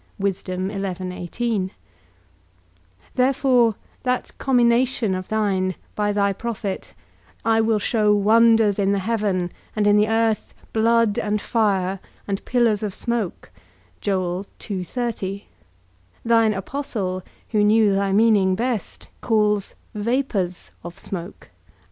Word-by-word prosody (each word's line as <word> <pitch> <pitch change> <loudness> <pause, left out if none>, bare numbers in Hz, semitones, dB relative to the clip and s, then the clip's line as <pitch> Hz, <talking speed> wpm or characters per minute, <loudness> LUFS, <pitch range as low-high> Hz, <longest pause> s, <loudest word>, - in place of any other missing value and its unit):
Therefore 190 +1 -2 2.3
that 250 -1 -1
commination 240 -4 +2
of 185 0 -4
thine, 195 -4 0 0.2
by 205 -1 0
thy 200 -1 +1
prophet, 210 -2 -5 0.5
I 225 0 +4
will 220 -1 +2
show 210 0 +2
wonders 220 0 +4
in 200 0 +2
the - - +1
heaven, 195 -4 -1 0.2
and 210 -1 +1
in 205 0 +5
the 210 +1 +4
earth, 225 -1 0 0.2
blood 230 -1 +3
and 210 0 0
fire, 195 -4 0 0.3
and 195 -1 -2
pillars 235 -4 +2
of 205 -3 -3
smoke; 235 -6 -3 0.5
thine 185 -1 -1 2.1
apostle, 195 -4 -3 0.3
who 210 -2 +2
knew 210 -1 +4
thy 195 0 +1
meaning 200 -3 +4
best, 235 0 -3
calls 210 -3 +1 0.2
vapours 210 -5 -1
of 175 0 -8
smoke. 180 0 -7
210 Hz, 100 wpm, -22 LUFS, 195-225 Hz, 2.3 s, in